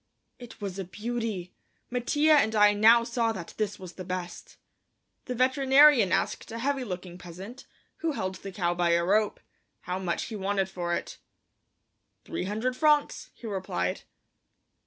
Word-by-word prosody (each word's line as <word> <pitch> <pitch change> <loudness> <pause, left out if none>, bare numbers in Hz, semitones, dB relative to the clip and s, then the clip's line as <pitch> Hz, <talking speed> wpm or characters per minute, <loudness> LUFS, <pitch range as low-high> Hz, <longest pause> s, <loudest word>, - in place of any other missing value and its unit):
It 245 -2 -12
was 195 -2 -5
a - - -2
beauty! 215 -2 -4 0.4
Mattia 290 +5 +2
and 220 -7 +3
I 210 -1 +6
now 225 +3 +6
saw 230 -1 0
that 170 -5 -8
this 210 -1 -2
was 185 -2 -10
the 185 - -8
best. 180 -1 -6 0.7
The 250 - -4
veterinarian 265 -3 +5
asked - - -1
a 230 - -5
heavy 270 +2 -1
looking 180 -4 -7
peasant, 190 +9 -10 0.3
who 325 -2 -1
held 185 -7 -3
the 195 +1 -8
cow 175 -3 0
by 175 -1 +2
a 170 0 +2
rope, 210 +3 +2 0.4
how 180 +1 -4
much 175 -3 -2
he 225 - -6
wanted 195 -1 -1
for 175 -2 -2
it. - - -6 1.1
"Three - - -4
hundred 220 +6 -2
francs," 300 +1 +2
he - - -13
replied. 185 - -2
210 Hz, 155 wpm, -28 LUFS, 185-245 Hz, 1.1 s, I